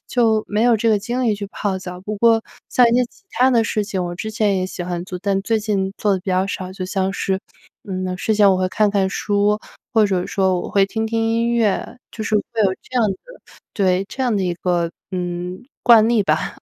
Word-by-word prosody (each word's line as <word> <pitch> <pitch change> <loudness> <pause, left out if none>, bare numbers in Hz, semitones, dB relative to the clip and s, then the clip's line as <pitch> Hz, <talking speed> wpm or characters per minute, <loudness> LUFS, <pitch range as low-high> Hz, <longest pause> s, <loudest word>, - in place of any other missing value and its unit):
就 225 -3 +2
没 210 +1 0
有 240 -1 +5
这 230 +2 +1
个 215 - +3
精 240 +5 -3
力 220 -3 +2
去 200 0 -5
泡 195 -2 -2
澡。 180 -1 -8
不 210 +2 -4
过 225 +1 +4 0.3
像 250 - +5
一 - - +1
些 250 +1 +4
其 390 - -26
他 250 +3 +3
的 235 -3 +3
事 210 0 0
情， 195 -3 -2
我 175 0 -4
之 215 +5 -5
前 210 -2 +1
也 185 - -1
喜 185 - -6
欢 175 -1 -3
做， 180 - -5
但 195 -1 +1
最 225 +2 +1
近 200 -3 -1
做 205 -2 +1
得 190 - +1
比 190 - -9
较 185 +1 +2
少， 185 -2 -5
就 190 -1 -5
像 190 +1 -1
是， 190 -1 -1 0.5
嗯， 185 -1 -3
睡 220 - 0
前 205 -1 +5
我 190 - +3
会 185 0 +1
看 210 +2 +2
看 195 -2 +1
书， 205 +2 +1 0.3
或 220 -3 +5
者 185 -2 -1
说 190 -2 +1
我 - - -6
会 200 -1 +4
听 220 +3 -2
听 225 0 -1
音 230 +1 +1
乐， 225 -2 0
就 220 - -6
是 215 - -1
会 205 - +1 0.2
有 190 - +3
这 255 - -3
样 225 - +4
的 195 - -2 0.6
对 190 -2 +1
这 265 - -4
样 245 -4 +1
的 195 - 0
一 180 -1 0
个， 175 -1 0 0.2
嗯， 180 +2 -4 0.2
惯 225 -3 +7
例 230 -3 +3
吧。 155 -4 -1
200 Hz, 260 characters per minute, -20 LUFS, 185-220 Hz, 0.6 s, 惯